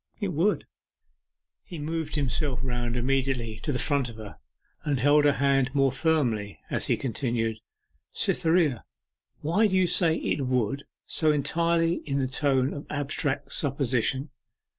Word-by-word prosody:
'It 205 Hz, -3 st, -1 dB
would.' 180 Hz, +6 st, +1 dB, 1.0 s
He 175 Hz, -, -9 dB
moved 155 Hz, +1 st, -3 dB
himself 140 Hz, -2 st, 0 dB
round 120 Hz, -2 st, -2 dB
immediately 125 Hz, -3 st, -1 dB
to 150 Hz, -, -2 dB
the 130 Hz, -, 0 dB
front 140 Hz, -2 st, +1 dB
of 115 Hz, -, -10 dB
her, 110 Hz, -2 st, -10 dB, 0.4 s
and 145 Hz, -4 st, 0 dB
held 145 Hz, +3 st, +4 dB
her 145 Hz, -, +5 dB
hand 135 Hz, -1 st, +1 dB
more 135 Hz, -1 st, +3 dB
firmly, 125 Hz, -, 0 dB
as -, -, +1 dB
he -, -, +2 dB
continued, 115 Hz, -3 st, -2 dB, 0.5 s
'Cytherea, 160 Hz, -, +1 dB, 0.6 s
why 190 Hz, +9 st, +3 dB
do 190 Hz, -, -1 dB
you 185 Hz, -, +4 dB
say 170 Hz, -2 st, +4 dB
"It 140 Hz, -4 st, -1 dB
would," 125 Hz, +2 st, 0 dB, 0.2 s
so 155 Hz, -2 st, +1 dB
entirely 165 Hz, +3 st, +1 dB
in 140 Hz, -1 st, -1 dB
the 135 Hz, -1 st, 0 dB
tone 135 Hz, 0 st, +1 dB
of 145 Hz, -, -8 dB
abstract 145 Hz, -1 st, -2 dB
supposition? 135 Hz, 0 st, 0 dB
140 Hz, 145 wpm, -27 LUFS, 125-155 Hz, 1.0 s, her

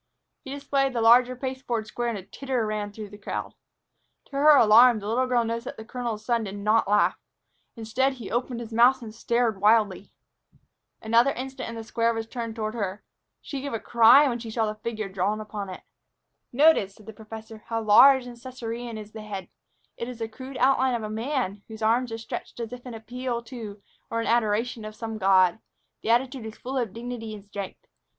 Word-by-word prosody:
He -, -, -9 dB
displayed 275 Hz, -1 st, 0 dB
the 240 Hz, -, -1 dB
larger 245 Hz, +2 st, +6 dB
pasteboard 255 Hz, -3 st, -3 dB
square 240 Hz, +2 st, -3 dB
and 230 Hz, -, -3 dB
a 190 Hz, -, -8 dB
titter 255 Hz, +2 st, -3 dB
ran 210 Hz, -1 st, -3 dB
through 210 Hz, 0 st, -8 dB
the 205 Hz, +1 st, -12 dB
crowd. -, -, -5 dB, 0.7 s
To -, -, -28 dB
her 290 Hz, +2 st, +6 dB
alarm, 235 Hz, 0 st, +7 dB
the 205 Hz, -1 st, -6 dB
little 250 Hz, +4 st, +1 dB
girl 245 Hz, -2 st, +2 dB
noticed 230 Hz, +1 st, -3 dB
that -, -, -7 dB
the 220 Hz, -, -9 dB
colonel's 235 Hz, -3 st, -4 dB
son 235 Hz, -1 st, +1 dB
did 200 Hz, 0 st, -6 dB
not 210 Hz, +2 st, +2 dB
laugh. 205 Hz, +1 st, +3 dB, 0.6 s
Instead, 235 Hz, +4 st, 0 dB
he 240 Hz, -6 st, -9 dB
opened 240 Hz, 0 st, -2 dB
his 230 Hz, -1 st, -8 dB
mouth 245 Hz, +3 st, +5 dB
and 215 Hz, -2 st, -8 dB
stared 230 Hz, -3 st, 0 dB
wildly. 210 Hz, -3 st, +3 dB, 0.9 s
Another 230 Hz, +4 st, +4 dB
instant 265 Hz, 0 st, -6 dB
and 230 Hz, -, -7 dB
the 225 Hz, -, -6 dB
square 230 Hz, +1 st, 0 dB
was 225 Hz, 0 st, -3 dB
turned 230 Hz, -1 st, -5 dB
toward 215 Hz, -1 st, -3 dB
her. 205 Hz, -3 st, -4 dB, 0.4 s
She 275 Hz, -2 st, -5 dB
gave 280 Hz, -2 st, -5 dB
a 225 Hz, -, -1 dB
cry 240 Hz, +7 st, +6 dB
when 240 Hz, -2 st, -1 dB
she 230 Hz, -1 st, -7 dB
saw 220 Hz, 0 st, 0 dB
the 215 Hz, -, -2 dB
figure 220 Hz, -2 st, -4 dB
drawn 195 Hz, +2 st, -1 dB
upon 210 Hz, -2 st, -6 dB
it. 185 Hz, -, -8 dB, 0.7 s
"Notice," 250 Hz, -8 st, +4 dB
said 215 Hz, -, -17 dB
the 220 Hz, -, -9 dB
professor, 220 Hz, +1 st, -11 dB
"how 225 Hz, -1 st, -2 dB
large 260 Hz, +5 st, +7 dB
and 245 Hz, -1 st, -9 dB
Cæsarean 235 Hz, -2 st, -6 dB
is 210 Hz, 0 st, -9 dB
the 220 Hz, -, -8 dB
head. 200 Hz, -3 st, -7 dB, 0.5 s
It 235 Hz, -, -4 dB
is 250 Hz, -, -7 dB
the 225 Hz, -1 st, -3 dB
crude 260 Hz, +4 st, -9 dB
outline 260 Hz, -1 st, +3 dB
of 230 Hz, -, -3 dB
a 215 Hz, -, -4 dB
man 220 Hz, -3 st, -2 dB
whose 220 Hz, 0 st, -8 dB
arms 235 Hz, +2 st, +2 dB
are -, -, -3 dB
outstretched 225 Hz, +1 st, -7 dB
as 230 Hz, 0 st, -5 dB
if 250 Hz, +1 st, -9 dB
in 240 Hz, -, -7 dB
appeal 240 Hz, +1 st, -4 dB
to 225 Hz, -4 st, -8 dB, 0.3 s
or 230 Hz, -, -1 dB
in 230 Hz, -, -2 dB
adoration 230 Hz, 0 st, +1 dB
of 215 Hz, 0 st, -8 dB
some 225 Hz, -1 st, -5 dB
god. 190 Hz, -1 st, +4 dB, 0.4 s
The -, -, -4 dB
attitude 250 Hz, 0 st, +1 dB
is 220 Hz, -, -9 dB
full 260 Hz, +1 st, -3 dB
of 235 Hz, -5 st, -2 dB
dignity 230 Hz, -1 st, -6 dB
and 205 Hz, -1 st, -12 dB
strength. 200 Hz, -, -7 dB
230 Hz, 210 wpm, -26 LUFS, 215-250 Hz, 0.9 s, alarm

